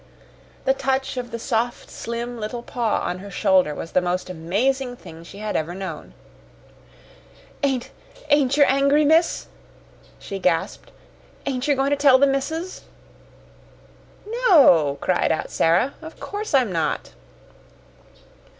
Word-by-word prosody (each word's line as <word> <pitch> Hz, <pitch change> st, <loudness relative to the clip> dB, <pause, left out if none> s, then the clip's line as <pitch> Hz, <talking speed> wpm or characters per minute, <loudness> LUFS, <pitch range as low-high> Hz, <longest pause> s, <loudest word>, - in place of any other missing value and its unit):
The 265 Hz, -, +4 dB
touch 265 Hz, 0 st, -1 dB
of 250 Hz, -1 st, -4 dB
the 230 Hz, -, -5 dB
soft, 235 Hz, 0 st, -2 dB
slim 235 Hz, +1 st, -5 dB
little 230 Hz, +3 st, -5 dB
paw 235 Hz, -4 st, -1 dB
on 180 Hz, -, -3 dB
her 200 Hz, +2 st, -9 dB
shoulder 185 Hz, -5 st, +2 dB
was 165 Hz, -, -7 dB
the 185 Hz, -, +3 dB
most 180 Hz, +1 st, -2 dB
amazing 245 Hz, +10 st, -1 dB
thing 165 Hz, -8 st, -12 dB
she 180 Hz, -, -12 dB
had 215 Hz, 0 st, -4 dB
ever 165 Hz, +3 st, -2 dB
known. 185 Hz, -5 st, -7 dB, 1.5 s
"Ain't 265 Hz, -4 st, -1 dB, 0.4 s
ain't 285 Hz, -2 st, +3 dB
yer 290 Hz, -, +7 dB
angry, 280 Hz, +3 st, +3 dB
miss?" 325 Hz, +3 st, +3 dB, 0.7 s
she 195 Hz, -, -7 dB
gasped. 180 Hz, -3 st, -1 dB, 0.6 s
"Ain't 265 Hz, 0 st, -2 dB
yer 290 Hz, -, +3 dB
goin' 270 Hz, +1 st, 0 dB
to -, -, +4 dB
tell 280 Hz, -2 st, +6 dB
the 280 Hz, -, +5 dB
missus?" 320 Hz, +7 st, -2 dB, 1.5 s
"No," 300 Hz, -, +5 dB
cried 185 Hz, -, +1 dB
out 160 Hz, -, -2 dB
Sara. 170 Hz, +12 st, +2 dB
"Of 320 Hz, 0 st, -11 dB
course 410 Hz, -6 st, -3 dB
I'm 250 Hz, -7 st, +3 dB
not." 155 Hz, -, -2 dB
245 Hz, 135 wpm, -22 LUFS, 185-275 Hz, 1.5 s, yer